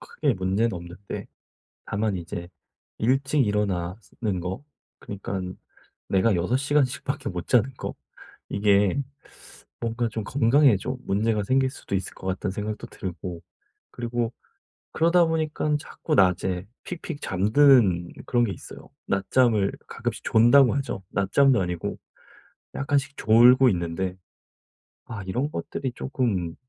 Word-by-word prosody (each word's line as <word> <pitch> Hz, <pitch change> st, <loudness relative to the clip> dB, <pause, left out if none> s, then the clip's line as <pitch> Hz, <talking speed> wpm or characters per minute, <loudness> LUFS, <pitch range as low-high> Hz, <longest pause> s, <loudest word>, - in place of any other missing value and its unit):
크게 140 Hz, -6 st, -1 dB
문제는 95 Hz, +5 st, 0 dB
없는데 85 Hz, +3 st, -7 dB, 0.6 s
다만 105 Hz, -1 st, -1 dB
이제 85 Hz, 0 st, -6 dB, 0.5 s
일찍 135 Hz, +2 st, +2 dB
일어나는 100 Hz, 0 st, -2 dB
거 95 Hz, +8 st, -4 dB, 0.4 s
그니깐 95 Hz, -2 st, -5 dB, 0.5 s
내가 100 Hz, +3 st, +3 dB
6 90 Hz, +9 st, 0 dB
시간씩밖에 140 Hz, -1 st, 0 dB
못 90 Hz, -2 st, -5 dB
자는 125 Hz, +2 st, +3 dB
거 -, -, -5 dB, 0.6 s
이게 100 Hz, +4 st, +3 dB, 0.8 s
'뭔가 115 Hz, 0 st, -1 dB
좀 110 Hz, -1 st, -5 dB
건강에 130 Hz, 0 st, +4 dB
좀 125 Hz, +6 st, -4 dB
문제가 105 Hz, +1 st, +1 dB
생길 130 Hz, +4 st, +2 dB
수도 115 Hz, -, -7 dB
있을 95 Hz, -, -2 dB
것 95 Hz, -, -10 dB
같다.'는 95 Hz, +1 st, -2 dB
생각도 105 Hz, +1 st, -4 dB
들고 90 Hz, -2 st, -6 dB, 0.5 s
그리고 120 Hz, 0 st, -2 dB, 0.6 s
그러다 170 Hz, +2 st, +4 dB
보니깐 155 Hz, -2 st, 0 dB
자꾸 155 Hz, -, -5 dB
낮에 95 Hz, -2 st, +2 dB, 0.2 s
픽픽 165 Hz, -3 st, -6 dB
잠드는 100 Hz, -3 st, +4 dB, 0.2 s
그런 120 Hz, -1 st, +2 dB
게 105 Hz, -, 0 dB
있어요. -, -, -11 dB, 0.2 s
낮잠을 105 Hz, +1 st, +2 dB, 0.2 s
가끔씩 -, -, -4 dB
존다고 120 Hz, +3 st, +5 dB
하죠. 135 Hz, -8 st, -3 dB
낮잠도 125 Hz, +4 st, +3 dB
아니고 90 Hz, -2 st, -3 dB, 0.8 s
약간씩 140 Hz, 0 st, 0 dB
졸고 125 Hz, +4 st, +6 dB
있는데 90 Hz, 0 st, -1 dB, 0.9 s
아 110 Hz, -3 st, -6 dB
이런 125 Hz, +11 st, -2 dB
것들이 135 Hz, -4 st, -4 dB
쪼끔 105 Hz, -11 st, -2 dB
110 Hz, 265 characters per minute, -25 LUFS, 95-130 Hz, 0.9 s, 졸고